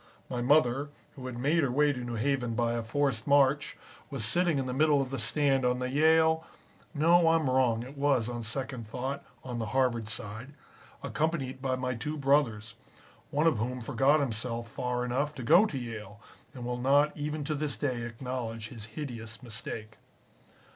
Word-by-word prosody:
My 120 - -2
mother, 140 +1 +3 0.3
who 130 -2 -7
had 125 -2 -6
made 150 +7 +2
her 140 - +1
way 145 +3 +3
to 125 - -6
New 120 -1 -4
Haven 125 -1 0
by 120 0 +1
a 120 - -1
forced 115 0 -1
march, 140 0 +3 0.3
was 135 -7 -3
sitting 170 +6 +2
in 135 - -1
the 130 - -3
middle 150 +1 +4
of 135 -1 -2
the 135 - -3
stand 135 +4 +2
on 125 0 +2
the 125 0 -3
Yale 160 +2 +4 0.5
(no, 165 +3 +5
I'm 165 -3 +3
wrong, 125 -3 +2
it 130 +4 -10
was, 140 -5 +2
on 120 -1 -4
second 120 +1 -4
thought, 130 +5 -4 0.2
on 125 -2 -5
the 110 - -2
Harvard 120 -4 +1
side) 110 +5 -6 0.5
accompanied 140 -4 -2
by 130 -1 0
my 130 0 -2
two 150 +7 -4
brothers, 130 -6 +1 0.6
one 150 +3 +1
of 155 -10 +3
whom 125 +3 -2
forgot 135 +5 +3
himself 115 -2 -2
far 125 +2 -2
enough 140 +5 -1
to 130 - -6
go 175 - +6
to 145 - -5
Yale, 105 -5 -7 0.4
and 125 -2 -6
will 125 0 -3
not 145 +3 +3
even 150 +1 -3
to 155 - -2
this 145 -5 -2
day 125 0 -1
acknowledge 115 -2 -5
his 115 -4 -9
hideous 115 -5 -6
mistake. 110 -2 -6
130 Hz, 185 wpm, -30 LUFS, 120-145 Hz, 0.6 s, go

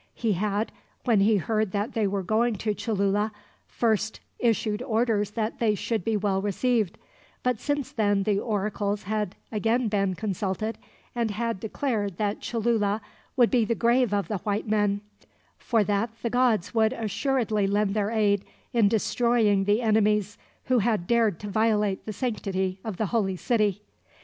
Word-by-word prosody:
He 225 -3 0
had, 205 +3 -1 0.3
when 230 -5 +4
he 210 +2 +4
heard 215 +1 -1
that 205 +2 -1
they 220 -3 +1
were 195 0 -2
going 225 +4 +1
to 210 +2 -1
Cholula, 205 0 0 0.4
first 220 -1 0 0.2
issued 225 -2 +1
orders 220 -3 +1
that 220 0 -2
they 220 -3 +2
should 220 -1 -2
be 220 +1 +1
well 195 -2 0
received; 210 0 0 0.5
but 250 -3 +1
since 290 -2 -2
then 205 -3 +1
the 200 -1 +1
oracles 205 -1 -1
had 210 -1 -2 0.2
again 225 +2 +1
been 195 -3 0
consulted, 210 +2 -3 0.3
and 235 -2 0
had 230 0 -2
declared 210 -4 -2
that 205 -1 -1
Cholula 220 -3 0 0.4
would 240 -2 +5
be 245 -3 +4
the 230 +2 0
grave 240 0 +3
of 200 -4 0
the 205 0 -2
white 205 +4 -2
men, 205 -1 +1 0.6
for 225 -3 +2
that 205 +3 0
the 235 - -1
gods 245 -6 +2
would 220 +1 +3
assuredly 220 -2 0
lend 200 0 +1
their 205 -1 0
aid 205 -3 +2 0.3
in 230 -4 +4
destroying 220 -2 +2
the 210 +4 +2
enemies 210 -2 +2 0.3
who 255 -2 +2
had 215 -4 +1
dared 225 -4 +2
to 205 - -5
violate 210 -1 +1
the 215 - -3
sanctity 190 -5 -2
of 215 -5 -5
the 220 - 0
holy 195 -5 +1
city. 210 -1 0
215 Hz, 165 wpm, -26 LUFS, 200-230 Hz, 0.6 s, would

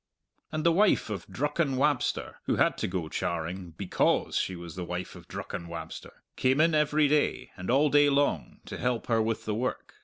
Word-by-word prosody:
And 155 -1 -2
the 170 - +5
wife 190 - +3
of 100 -5 -5
Drucken 150 0 0
Wabster 145 -1 0
who - - +1
had - - +3
to - - 0
go 90 -3 -3
charing 85 +2 -3
because 95 -3 +1
she 95 - 0
was 85 -2 -9
the 90 - -4
wife 90 +1 -5
of - - -13
Drucken 85 - -6
Wabster 80 -1 -8
came 130 +2 +2
in 165 +1 +4
every 150 0 +3
day, 150 +1 +1
and 90 -1 -7
all 140 +4 +4
day 145 0 +6
long, 140 +1 0
to - - -7
help 125 -1 -1
her 115 -1 +2
with 110 0 -1
the 110 - -1
work. 125 +4 -3
125 Hz, 195 wpm, -28 LUFS, 90-150 Hz, -, day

